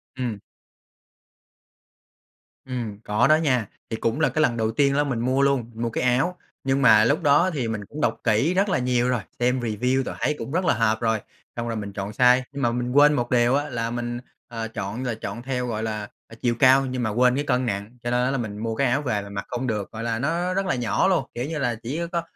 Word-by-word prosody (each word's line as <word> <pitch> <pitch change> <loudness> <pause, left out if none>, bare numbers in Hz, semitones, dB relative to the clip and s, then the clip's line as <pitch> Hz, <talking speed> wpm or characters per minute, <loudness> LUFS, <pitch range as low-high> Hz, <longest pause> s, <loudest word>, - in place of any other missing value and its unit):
Ừm. 120 -6 -3 2.3
Ừm, 115 -5 -5
có 105 +3 +2
đó 155 - +6
nha. 130 -9 +1 0.2
Thì 110 - -3
cũng 115 +7 -1
là 155 - +3
cái 155 - 0
lần 120 -6 +2
đầu 110 0 0
tiên 140 +3 +2
đó 145 +1 +2
mình 130 -5 -2
mua 130 +3 +1
luôn, 135 -4 +1
mua 115 +1 -2
cái 115 - -2
áo. 135 +9 +1 0.3
Nhưng 135 +1 +1
mà 110 -4 +7
lúc 145 +5 +1
đó 150 +6 +4
thì 125 -6 -2
mình 105 -2 -4
cũng 150 +7 -8
đọc - - 0
kỹ 120 +10 +2
rất 195 +2 +2
là 180 - +1
nhiều 125 -1 +1
rồi, 120 -4 0 0.2
xem 125 +1 +2
review 125 +4 0
rồi - - -5
thấy 150 - 0
cũng 135 - -6
rất 180 +2 0
là - - +4
hợp 110 -1 +1
rồi, 110 -1 +1 0.4
xong 120 0 -3
rồi 115 - -2
mình 100 -2 -6
chọn 100 0 -4
size. 125 +3 +5
Nhưng 140 0 -5
mà 120 -2 +2
mình 125 +1 -2
quên 145 +2 +6
một 120 -4 -1
điều 120 +1 +4
á, 145 +1 -1
là 115 -2 -2
mình, 120 0 -3 0.3
ờ, 115 -1 -5
chọn 110 +2 -5
rồi 120 -3 -2
chọn 110 +1 -6
theo, 125 -1 -2
gọi 110 -1 -3
là, 105 -2 -3 0.2
ờ, 115 - -13
chiều 120 -1 +1
cao 135 +1 +6
nhưng 125 -1 -3
mà 110 - 0
quên 125 +3 +3
cái 145 - 0
cân 125 -2 0
nặng, 105 +2 -4
cho 120 - -2
nên 125 0 +2
á, 130 - +1
là 135 - 0
mình 105 -3 -4
mua 115 +1 -3
cái 135 +2 +2
áo 135 +5 +1
về 110 -7 -1
là 100 - -9
mặc 100 0 -5
không 125 +1 -3
được, 105 -3 -3
gọi 110 +1 -6
là, 115 -1 -1
nó 170 +6 0
rất 195 +1 0
là 185 - 0
nhỏ 125 +9 +1
luôn. 170 -8 +2
Kiểu 120 +2 -2
như 155 0 -4
là 120 -4 0
chỉ 145 +8 -3
có 170 -1 0
125 Hz, 260 wpm, -24 LUFS, 115-135 Hz, 2.3 s, mà